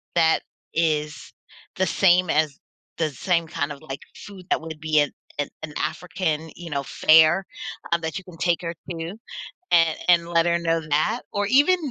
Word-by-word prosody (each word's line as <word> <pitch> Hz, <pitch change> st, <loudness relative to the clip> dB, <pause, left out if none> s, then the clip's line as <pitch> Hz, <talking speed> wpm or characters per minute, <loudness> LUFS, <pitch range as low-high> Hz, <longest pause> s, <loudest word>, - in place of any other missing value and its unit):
that 160 Hz, -1 st, +4 dB, 0.3 s
is 150 Hz, -2 st, -1 dB, 0.4 s
the 190 Hz, -, +2 dB
same 180 Hz, -2 st, +4 dB
as 155 Hz, -2 st, +2 dB, 0.4 s
the 160 Hz, -2 st, +1 dB
same 170 Hz, +3 st, 0 dB
kind 145 Hz, -1 st, -3 dB
of 140 Hz, -, -9 dB
like, 135 Hz, -3 st, -7 dB
food 195 Hz, -3 st, -11 dB
that -, -, +2 dB
would 160 Hz, -1 st, -8 dB
be 155 Hz, -1 st, +2 dB
an 145 Hz, -, +1 dB, 0.5 s
an 155 Hz, -1 st, -6 dB
African, 160 Hz, 0 st, -2 dB
you 175 Hz, -1 st, -8 dB
know, 140 Hz, -2 st, -2 dB
fare, 160 Hz, +6 st, +5 dB, 0.5 s
uh, -, -, +5 dB
that 160 Hz, +1 st, -4 dB
you 185 Hz, -, -8 dB
can 180 Hz, -, -12 dB
take 175 Hz, 0 st, +1 dB
her 170 Hz, -1 st, -4 dB, 0.2 s
to 165 Hz, +1 st, -5 dB, 0.6 s
a 165 Hz, -2 st, +5 dB
and 170 Hz, -1 st, +4 dB
let 170 Hz, -1 st, +3 dB
her 170 Hz, 0 st, +2 dB
know 165 Hz, -1 st, 0 dB
that, 210 Hz, +12 st, +1 dB
or 205 Hz, 0 st, 0 dB
even 290 Hz, -, +5 dB
165 Hz, 175 wpm, -24 LUFS, 155-175 Hz, 0.6 s, fare